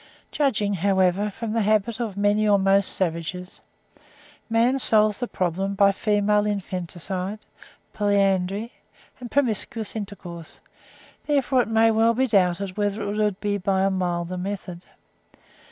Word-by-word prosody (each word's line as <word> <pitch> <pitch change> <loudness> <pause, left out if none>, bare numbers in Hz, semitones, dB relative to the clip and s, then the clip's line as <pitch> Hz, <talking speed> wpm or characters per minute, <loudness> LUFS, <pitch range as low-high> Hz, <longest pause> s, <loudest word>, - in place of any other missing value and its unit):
Judging, 215 -8 0
however, 190 +1 +1
from 220 +2 -5
the 230 - +1
habits 215 +2 +1
of 220 -5 -4
many 205 +1 +2
or 205 -1 +5
most 195 0 +2
savages, 180 +1 -4 0.9
man 235 +4 +2
solves 215 -4 +3
the 245 - -2
problem 190 +2 -2
by 200 0 +5
female 210 +1 +1
infanticide, 185 0 -4 0.6
polyandry 200 +1 0 0.5
and 245 -1 -8
promiscuous 225 -5 -1
intercourse; 190 -6 -8 0.7
therefore 275 -3 +2
it - - -3
may 225 0 +4
well 225 +1 +3
be 260 +3 +2
doubted 190 -4 +1
whether 205 +1 -1
it 205 +1 -3
would 210 -2 0
be 205 -1 -1
by 190 0 0
a 195 - +2
milder 180 -1 -2
method. 185 -2 -6
205 Hz, 135 wpm, -24 LUFS, 190-220 Hz, 0.9 s, or